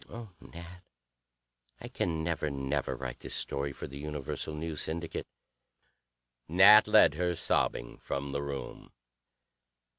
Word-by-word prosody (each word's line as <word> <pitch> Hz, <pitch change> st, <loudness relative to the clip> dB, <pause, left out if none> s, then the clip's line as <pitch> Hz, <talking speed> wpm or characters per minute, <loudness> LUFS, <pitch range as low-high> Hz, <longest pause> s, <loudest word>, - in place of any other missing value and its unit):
Oh, 115 Hz, -2 st, -9 dB
Nat, 85 Hz, +1 st, -11 dB, 1.0 s
I -, -, -8 dB
can 80 Hz, -3 st, -2 dB
never, 80 Hz, -2 st, -1 dB
never 70 Hz, -1 st, -2 dB
write 65 Hz, -1 st, -6 dB
this -, -, -5 dB
story 70 Hz, 0 st, -2 dB
for -, -, -8 dB
the 70 Hz, +1 st, -9 dB
Universal 75 Hz, +1 st, -4 dB
News 80 Hz, -1 st, -3 dB
Syndicate." 85 Hz, +1 st, -4 dB, 1.2 s
Nat 100 Hz, +6 st, +8 dB
led -, -, +6 dB
her, 90 Hz, +2 st, -1 dB
sobbing, -, -, -1 dB
from 70 Hz, 0 st, -4 dB
the 70 Hz, +1 st, -2 dB
room. 70 Hz, -1 st, -7 dB
75 Hz, 125 wpm, -30 LUFS, 70-85 Hz, 1.2 s, Nat